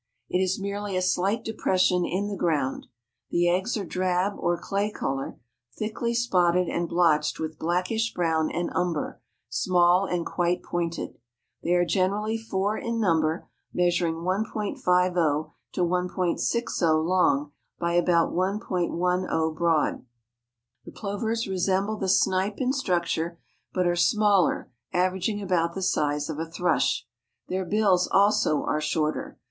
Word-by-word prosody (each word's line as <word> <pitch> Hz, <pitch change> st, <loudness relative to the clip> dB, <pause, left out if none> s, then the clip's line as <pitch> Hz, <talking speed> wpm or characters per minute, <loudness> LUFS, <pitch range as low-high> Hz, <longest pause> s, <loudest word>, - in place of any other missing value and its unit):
It 180 Hz, -, +1 dB
is 190 Hz, +1 st, 0 dB
merely 200 Hz, 0 st, -3 dB
a -, -, +1 dB
slight 195 Hz, +5 st, +1 dB
depression 185 Hz, -4 st, +1 dB
in 195 Hz, +3 st, -1 dB
the 205 Hz, -, -3 dB
ground. 150 Hz, -7 st, -1 dB, 0.4 s
The 175 Hz, 0 st, +2 dB
eggs 190 Hz, +7 st, +1 dB
are 200 Hz, -, -3 dB
drab 185 Hz, +2 st, 0 dB
or 175 Hz, 0 st, +1 dB
clay 200 Hz, +1 st, -1 dB
color, 135 Hz, -9 st, -4 dB, 0.4 s
thickly 230 Hz, +2 st, -2 dB
spotted 180 Hz, -6 st, +2 dB
and 170 Hz, 0 st, -2 dB
blotched 155 Hz, -4 st, +2 dB
with 160 Hz, -1 st, -5 dB
blackish 180 Hz, +7 st, 0 dB
brown 160 Hz, -2 st, 0 dB
and 175 Hz, 0 st, -2 dB
umber, 170 Hz, -9 st, -2 dB, 0.3 s
small 175 Hz, -, +3 dB
and 175 Hz, -2 st, -1 dB
quite 175 Hz, 0 st, 0 dB
pointed. 170 Hz, -1 st, -3 dB, 0.4 s
They 175 Hz, -, 0 dB
are 175 Hz, 0 st, +3 dB
generally 205 Hz, +4 st, 0 dB
four 210 Hz, -2 st, -1 dB
in 230 Hz, 0 st, -2 dB
number, 165 Hz, -4 st, +1 dB, 0.3 s
measuring 175 Hz, -2 st, +1 dB
1.50 180 Hz, -, 0 dB, 0.2 s
to -, -, -1 dB
1.60 180 Hz, -1 st, 0 dB
long 150 Hz, -6 st, +2 dB, 0.3 s
by 170 Hz, 0 st, -1 dB
about 175 Hz, -1 st, +3 dB
1.10 180 Hz, -3 st, 0 dB
broad. 165 Hz, -2 st, +1 dB, 0.8 s
The -, -, -11 dB
plovers 220 Hz, +2 st, -3 dB
resemble 190 Hz, +3 st, 0 dB
the 190 Hz, -2 st, -2 dB
snipe 190 Hz, +2 st, +2 dB
in 260 Hz, 0 st, 0 dB
structure, 170 Hz, -, -1 dB, 0.3 s
but 180 Hz, -1 st, 0 dB
are 175 Hz, 0 st, +2 dB
smaller, 200 Hz, -, +2 dB, 0.2 s
averaging 190 Hz, +3 st, 0 dB
about 170 Hz, -3 st, 0 dB
the 190 Hz, -, -3 dB
size 150 Hz, -5 st, 0 dB
of 155 Hz, -1 st, -5 dB
a 165 Hz, 0 st, -4 dB
thrush. 175 Hz, +1 st, +1 dB, 0.4 s
Their 190 Hz, 0 st, -1 dB
bills 195 Hz, -2 st, +2 dB
also 200 Hz, -5 st, +3 dB
are 155 Hz, -, -1 dB
shorter. 155 Hz, 0 st, -1 dB
180 Hz, 135 wpm, -26 LUFS, 170-200 Hz, 0.8 s, small